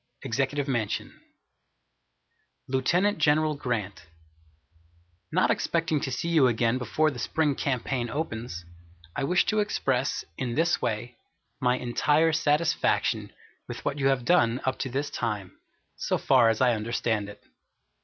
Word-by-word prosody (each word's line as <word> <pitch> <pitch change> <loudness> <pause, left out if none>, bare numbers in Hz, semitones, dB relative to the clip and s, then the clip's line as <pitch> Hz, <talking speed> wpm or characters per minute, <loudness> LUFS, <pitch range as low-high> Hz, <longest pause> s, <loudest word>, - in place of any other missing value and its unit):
Executive 135 +4 -1
Mansion, 120 -6 -2 1.5
Lieutenant 175 +10 +1
General 155 0 +3
Grant, 115 - -4 1.2
Not - - +3
expecting 165 -2 0
to 135 - -3
see 165 +7 -2
you 155 -6 +5
again 115 +1 +1
before 150 +6 +1
the 125 - -8
spring 150 +4 +1
campaign 130 -3 -2
opens, 115 - -4 0.5
I 145 - -2
wish 175 +6 +2
to 215 - +1
express, 135 -10 0
in 120 -3 -2
this 170 +2 +2
way, 115 +2 -3 0.4
my 125 0 +2
entire 150 +6 +2
satisfaction 150 +2 +1 0.4
with - - -8
what 145 - -1
you 135 - +2
have 135 -3 +1
done 120 -8 +3
up 130 0 -1
to 135 - -2
this 140 +3 -2
time, 105 -5 -4 0.4
so - - 0
far 125 -4 +4
as 110 +1 0
I 125 -2 +4
understand 110 -1 -1
it. 105 - -11
130 Hz, 135 wpm, -27 LUFS, 115-150 Hz, 1.5 s, you